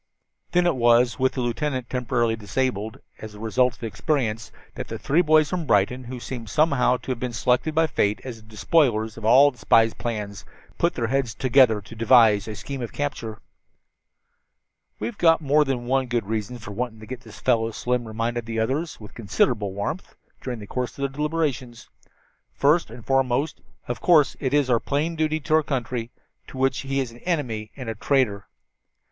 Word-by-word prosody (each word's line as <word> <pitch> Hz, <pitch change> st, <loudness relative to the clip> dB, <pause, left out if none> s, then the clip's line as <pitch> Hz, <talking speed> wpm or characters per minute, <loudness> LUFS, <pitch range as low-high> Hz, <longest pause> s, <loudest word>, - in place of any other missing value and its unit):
Then 180 Hz, 0 st, +3 dB
it 175 Hz, -4 st, +2 dB
was, 120 Hz, +1 st, +3 dB
with 130 Hz, 0 st, +2 dB
the 130 Hz, -, -2 dB
lieutenant 130 Hz, +1 st, -2 dB
temporarily 120 Hz, -2 st, 0 dB
disabled 110 Hz, 0 st, -3 dB, 0.2 s
as 110 Hz, -1 st, -9 dB
a -, -, -11 dB
result 120 Hz, +2 st, +1 dB
of -, -, -25 dB
his 115 Hz, -, -3 dB
experience, 115 Hz, -4 st, -2 dB, 0.2 s
that -, -, -6 dB
the -, -, -5 dB
three 155 Hz, +5 st, +2 dB
boys 155 Hz, -2 st, +4 dB
from 175 Hz, -4 st, -2 dB
Brighton, 115 Hz, +4 st, +2 dB
who 125 Hz, +1 st, -7 dB
seemed 120 Hz, -3 st, -7 dB
somehow 140 Hz, -3 st, +3 dB
to 130 Hz, -, -6 dB
have 125 Hz, -, -3 dB
been 125 Hz, -1 st, -3 dB
selected 125 Hz, +7 st, +1 dB
by 160 Hz, 0 st, +4 dB
Fate 105 Hz, -7 st, 0 dB
as 125 Hz, -3 st, -7 dB
the 110 Hz, -1 st, -18 dB
despoilers 110 Hz, -2 st, +1 dB
of 110 Hz, -, -8 dB
all 135 Hz, +6 st, +7 dB
the 125 Hz, -, -21 dB
spy's 115 Hz, 0 st, +4 dB
plans, 105 Hz, -4 st, -5 dB, 0.4 s
put 170 Hz, -, +1 dB
their 120 Hz, -, -1 dB
heads 125 Hz, -2 st, -1 dB
together 130 Hz, -5 st, +4 dB
to 110 Hz, +3 st, -12 dB
devise 115 Hz, -3 st, +5 dB
a 110 Hz, -, -5 dB
scheme 135 Hz, +3 st, -6 dB
of 120 Hz, -, -5 dB
capture. 115 Hz, -7 st, -4 dB, 1.6 s
"We've 235 Hz, -, -5 dB
got 165 Hz, -1 st, +5 dB
more 150 Hz, 0 st, +3 dB
than 130 Hz, -4 st, -2 dB
one 130 Hz, +1 st, +1 dB
good 120 Hz, -3 st, -1 dB
reason 110 Hz, +3 st, -3 dB
for 105 Hz, -3 st, -9 dB
wanting 115 Hz, +1 st, -4 dB
to -, -, -9 dB
get 125 Hz, +2 st, -7 dB
this 110 Hz, -4 st, -13 dB
fellow," 115 Hz, -3 st, +2 dB
Slim 120 Hz, +1 st, -2 dB
reminded 115 Hz, +1 st, -3 dB
the 115 Hz, -1 st, -4 dB
others 135 Hz, +9 st, -1 dB
with 105 Hz, -2 st, -12 dB
considerable 105 Hz, -1 st, 0 dB
warmth, 100 Hz, -, -5 dB, 0.3 s
during 125 Hz, -2 st, -4 dB
the 105 Hz, -, -9 dB
course 125 Hz, +4 st, -3 dB
of 140 Hz, -, -4 dB
their 140 Hz, -, 0 dB
deliberations. 145 Hz, -4 st, -3 dB, 0.7 s
"First 155 Hz, +5 st, +3 dB
and 115 Hz, 0 st, -11 dB
foremost, 135 Hz, +2 st, 0 dB, 0.3 s
of 120 Hz, -, -4 dB
course, 155 Hz, -6 st, +4 dB
is 140 Hz, 0 st, +1 dB
our 120 Hz, -2 st, +3 dB
plain 150 Hz, +7 st, -1 dB
duty 155 Hz, 0 st, 0 dB
to 155 Hz, +3 st, -2 dB
our 160 Hz, -, +6 dB
country, 125 Hz, -5 st, -3 dB, 0.4 s
to -, -, -10 dB
which 135 Hz, 0 st, +1 dB
he 135 Hz, 0 st, -2 dB
is 125 Hz, -3 st, -4 dB
an 120 Hz, -, -14 dB
enemy 125 Hz, -11 st, -2 dB
and 130 Hz, -3 st, -7 dB
a 115 Hz, -, -2 dB
traitor. 110 Hz, -4 st, 0 dB
125 Hz, 195 wpm, -24 LUFS, 115-140 Hz, 1.6 s, all